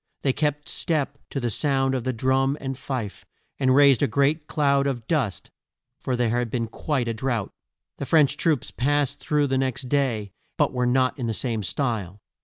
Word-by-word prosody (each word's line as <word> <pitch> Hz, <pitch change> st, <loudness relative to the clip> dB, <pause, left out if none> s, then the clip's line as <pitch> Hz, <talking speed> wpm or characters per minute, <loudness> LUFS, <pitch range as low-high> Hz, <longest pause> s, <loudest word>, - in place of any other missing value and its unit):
They 135 Hz, -, +2 dB
kept 150 Hz, 0 st, -1 dB
step 145 Hz, -3 st, -1 dB
to 135 Hz, -, -3 dB
the 120 Hz, -3 st, -1 dB
sound 135 Hz, +1 st, +1 dB
of 130 Hz, -3 st, -2 dB
the 130 Hz, -, +1 dB
drum 130 Hz, +3 st, +1 dB
and 135 Hz, -1 st, -4 dB
fife, 125 Hz, -5 st, -5 dB, 0.4 s
and 130 Hz, -1 st, +3 dB
raised 140 Hz, -3 st, +6 dB
a 145 Hz, -, +4 dB
great 150 Hz, +3 st, +1 dB
cloud 140 Hz, -2 st, +2 dB
of 120 Hz, -5 st, -3 dB
dust, 130 Hz, -, -1 dB, 0.5 s
for 130 Hz, -, -2 dB
there 120 Hz, -2 st, +1 dB
had 120 Hz, 0 st, 0 dB
been 115 Hz, 0 st, -1 dB
quite 125 Hz, +2 st, -2 dB
a 115 Hz, -, -1 dB
drought. 115 Hz, -2 st, -2 dB, 0.5 s
The 140 Hz, -, -3 dB
French 145 Hz, -1 st, +4 dB
troops 155 Hz, -4 st, 0 dB
passed 145 Hz, +1 st, 0 dB
through 150 Hz, -1 st, +1 dB
the 135 Hz, -1 st, 0 dB
next 130 Hz, -1 st, -2 dB
day, 120 Hz, -8 st, 0 dB, 0.3 s
but -, -, +2 dB
not 130 Hz, +2 st, +1 dB
in 120 Hz, -, -2 dB
the 110 Hz, -, -1 dB
same 115 Hz, -3 st, -1 dB
style. 105 Hz, -4 st, -2 dB
130 Hz, 190 wpm, -24 LUFS, 120-140 Hz, 0.5 s, raised